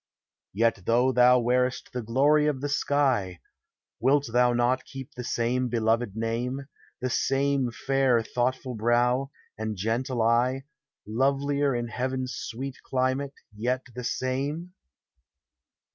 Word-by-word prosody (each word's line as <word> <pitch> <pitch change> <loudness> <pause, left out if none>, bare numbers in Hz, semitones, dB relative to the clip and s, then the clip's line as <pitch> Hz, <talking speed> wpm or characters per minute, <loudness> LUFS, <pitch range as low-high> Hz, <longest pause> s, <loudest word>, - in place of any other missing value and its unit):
Yet 110 -2 +1
though 125 +3 +3
thou 125 0 +6
wear'st 125 +1 0
the 125 - -2
glory 145 +7 +3
of 145 -3 0
the 145 - -2
sky, 130 - +1 0.6
Wilt 140 +4 +3
thou 125 0 +4
not 120 +2 +1
keep 135 +1 -9
the 125 - -6
same 120 +2 0
beloved 115 -2 0
name, 120 +4 -2 0.4
The 130 - -1
same 135 -1 +1
fair 130 -1 +1
thoughtful 125 +2 -2
brow, 120 +4 +1 0.3
and 110 -1 -3
gentle 115 +4 -1
eye, 125 +4 +2 0.4
Lovelier 140 +4 +1
in 120 0 -2
heaven's 130 +2 -2
sweet 135 +3 -5
climate, 130 +2 -1 0.2
yet 125 +4 -1
the 125 +1 -6
same? 140 +8 -2
125 Hz, 125 wpm, -27 LUFS, 120-135 Hz, 0.6 s, thou